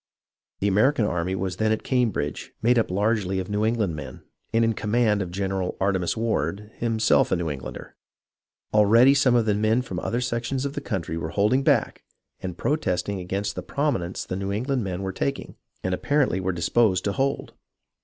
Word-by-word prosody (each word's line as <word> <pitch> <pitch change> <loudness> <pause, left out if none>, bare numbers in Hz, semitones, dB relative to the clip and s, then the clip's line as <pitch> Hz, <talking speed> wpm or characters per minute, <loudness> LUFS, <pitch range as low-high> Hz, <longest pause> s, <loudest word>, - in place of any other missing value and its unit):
The 100 - +2
American 110 +5 +3
army 90 -1 -1
was 95 -1 -3
then 110 +1 +1
at 110 - -1
Cam 125 -3 +2
bridge, 75 -7 -4
made 120 +1 +4
up 115 - 0
largely 100 0 0
of 95 +2 -3
New 105 +1 0
England 110 -7 0
men, 70 -4 -8 0.3
and 115 +1 +3
in 115 - +2
command 105 -1 +1
of 90 - -3
General 95 0 -2
Artemas 95 -2 0
Ward, 105 -2 -1
himself 115 -2 +2
a - - +4
New 85 -3 -2
Englander. 70 -2 -8 0.8
Already 115 +5 +6
some 130 -3 +3
of 115 -2 +3
the 105 - +2
men 110 +4 +2
from 95 -7 -5
other 115 +5 -1
sec 120 -1 -2
tions 135 +2 -2
of 140 - -3
the 145 - -4
country 90 - -3
were - - -4
holding 105 +7 +2
back - - +1 0.4
and 90 -2 -5
protesting 100 - -1
against 100 +3 -3
the - - -5
prominence 115 - -2
the - - -4
New 100 +1 -3
England 125 +4 -1
men 95 -1 -4
were 95 0 -3
taking, 140 +7 -3 0.3
and 95 - -1
apparently 135 -2 +1
were 95 0 -1
disposed 95 +3 +2
to 100 - 0
hold. 135 +6 -1
105 Hz, 195 wpm, -25 LUFS, 95-120 Hz, 0.8 s, Already